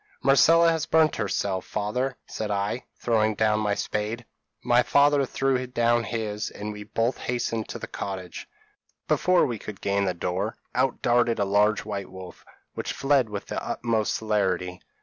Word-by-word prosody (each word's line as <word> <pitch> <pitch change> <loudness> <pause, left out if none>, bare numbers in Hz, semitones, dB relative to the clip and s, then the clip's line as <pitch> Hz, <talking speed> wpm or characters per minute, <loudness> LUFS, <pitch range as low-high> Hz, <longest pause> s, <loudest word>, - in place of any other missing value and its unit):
'Marcella 165 +5 +6
has 160 -1 -1
burnt 160 -2 +3
herself, 100 -3 -1
father,' 125 +6 -2
said 110 - -5
I, 100 +4 -2
throwing 110 -2 +1
down 105 0 +2
my 105 -1 0
spade. 110 +4 -3 0.4
My 120 0 +4
father 140 +1 +3
threw 130 -1 0
down 120 -1 +2
his, 110 -2 -3
and 105 +1 -6
we 105 - -9
both 115 +4 -1
hastened 115 -2 -2
to - - -5
the - - -6
cottage. 95 -3 -6 0.6
Before 180 -1 +3
we 120 -6 -3
could 105 -1 -8
gain 100 0 0
the 90 -2 -1
door, 90 +5 -2 0.2
out 130 +1 0
darted 120 -1 +3
a 100 - +1
large 105 +2 +2
white 100 -3 -4
wolf, 95 -1 -11 0.3
which - - -4
fled 135 -4 +2
with 105 -1 -5
the - - -4
utmost 115 -3 -1
celerity. 95 -4 -1
110 Hz, 165 wpm, -26 LUFS, 100-125 Hz, 0.6 s, Marcella